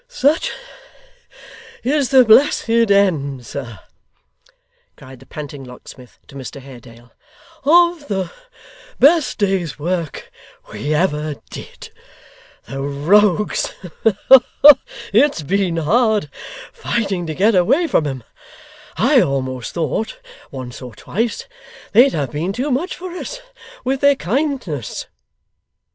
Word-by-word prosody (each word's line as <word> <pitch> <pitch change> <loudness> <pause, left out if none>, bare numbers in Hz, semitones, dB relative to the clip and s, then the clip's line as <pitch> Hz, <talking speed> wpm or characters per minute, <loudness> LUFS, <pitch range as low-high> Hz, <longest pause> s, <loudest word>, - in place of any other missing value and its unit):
'Such 320 - +1 1.3
is 280 +1 +1
the 260 -2 +6
blessed 245 +6 +4 0.2
end, 150 -11 +1
sir,' 120 -6 -7 1.2
cried 130 -1 -13
the - - -18
panting 145 -2 -8
locksmith, 125 0 -14
to - - -17
Mr 140 0 -8
Haredale, 120 -3 -14 0.5
'of 340 0 +4
the 190 -4 -3 0.7
best 305 +2 +3
day's 190 -5 -1
work 170 +1 -4 0.4
we 145 - -4
ever 150 -2 0 0.2
did. - - -10 0.7
The 135 0 -7
rogues! 180 +9 +1 1.4
it's 240 - +3
been 185 +1 0
hard 210 - +1 0.4
fighting 195 -7 -2
to 155 - -4
get 210 +6 +3
away 200 - +3
from 165 - +1
'em. 130 -4 -5 0.7
I - - +4
almost 130 -2 -3
thought, 170 - -2 0.3
once 130 -2 -8
or 125 -4 -10
twice, 225 - -3 0.5
they'd 250 +6 +5
have 140 -5 -2
been 170 +6 -3
too 265 +6 -2
much 295 +9 -1
for 365 0 -8
us - - -7 0.4
with 265 +1 -1
their 280 0 +5
kindness! 240 - -3
180 Hz, 110 wpm, -18 LUFS, -, 1.4 s, the